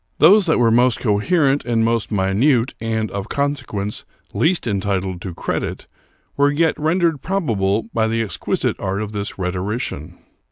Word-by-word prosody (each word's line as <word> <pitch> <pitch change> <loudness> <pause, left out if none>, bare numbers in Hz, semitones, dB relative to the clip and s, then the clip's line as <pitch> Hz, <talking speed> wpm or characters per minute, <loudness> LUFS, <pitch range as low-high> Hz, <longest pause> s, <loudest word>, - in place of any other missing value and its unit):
Those 190 +6 +6
that 160 - +3
were 120 -2 +4
m.ost 120 +1 +3
coherent 135 - +2
and 115 -1 +1
most 115 -1 0
minute, 115 +6 +2
and, 110 -2 -2
of 100 +1 -5
consequence, 130 -8 -3 0.3
least 170 +2 +1
entitled 95 -4 -2
to 90 -3 -6
credit, - - -3 0.5
were 140 0 +3
yet 160 +2 +2
rendered 160 -1 +1
probable 110 - 0
by 110 -1 +1
the 115 +1 0
exquisite 100 -6 -2
art 100 +2 -2
of 105 - -6
this 100 -1 -5
rhetorician. 90 - -4
115 Hz, 150 wpm, -20 LUFS, 100-145 Hz, 0.5 s, Those